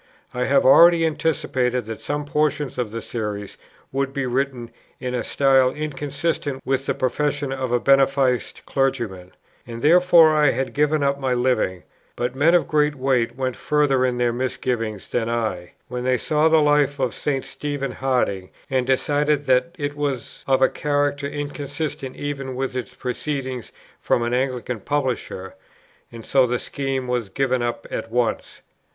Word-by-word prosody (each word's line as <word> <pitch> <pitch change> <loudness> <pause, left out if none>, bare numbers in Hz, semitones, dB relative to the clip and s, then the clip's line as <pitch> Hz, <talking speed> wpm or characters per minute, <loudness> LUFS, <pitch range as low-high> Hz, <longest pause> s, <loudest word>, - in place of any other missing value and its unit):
I 125 0 -1
had 140 0 +3
already 165 +5 +7
anticipated 130 -6 0
that 110 0 -7
some 145 0 -3
portions 150 -2 -1
of 120 -3 -1
the 115 +2 -6
Series 105 -3 -5 0.4
would 135 0 -1
be 140 -1 -1
written 125 -2 -2 0.3
in 125 -1 -4
a 125 - -1
style 135 -2 +3
inconsistent 145 0 -3
with 135 0 -1
the - - 0
professions 145 +1 -1
of 130 -2 -3
a 120 - +3
beneficed 135 -2 +2
clergyman, 120 -10 -2 0.3
and 115 0 -7
therefore 170 -1 +6
I 150 -2 +4
had 130 +2 -2
given 150 0 +2
up 140 0 +1
my 130 -2 0
Living; 120 -8 0 0.3
but 125 +1 -2
men 160 +6 +4
of 175 - +2
great 150 -1 +2
weight 130 -3 0
went 130 -1 -2
further 145 -4 +1
in 125 -1 0
their 120 -1 +1
misgivings 120 -4 -2
than 115 -1 -1
I, 110 -7 -2
when 125 0 -4
they 130 0 +2
saw 155 +4 +2
the 160 -1 +5
Life 145 -1 +3
of 130 -4 -1
St. 135 -3 -2
Stephen 145 -2 -4
Harding, 125 -8 -1 0.2
and 130 -2 +1
decided 145 +2 +1
that 130 +7 +2
it 145 -2 -3
was 140 -4 -4
of 135 -1 +3
a - - +7
character 145 -1 -1
inconsistent 145 -1 -5
even 135 -2 -4
with 130 0 -3
its 125 -2 -5
proceeding 130 -1 -3 0.4
from 120 - +1
an 120 +1 -1
Anglican 125 -2 -1
publisher: 125 -8 -3 0.6
and 115 -1 -10
so 130 -2 +3
the 125 +1 0
scheme 135 0 -3
was 120 -4 -1
given 130 +3 0
up 120 0 -3
at 115 - -4
once. 120 -1 -2
135 Hz, 165 wpm, -22 LUFS, 125-145 Hz, 0.6 s, already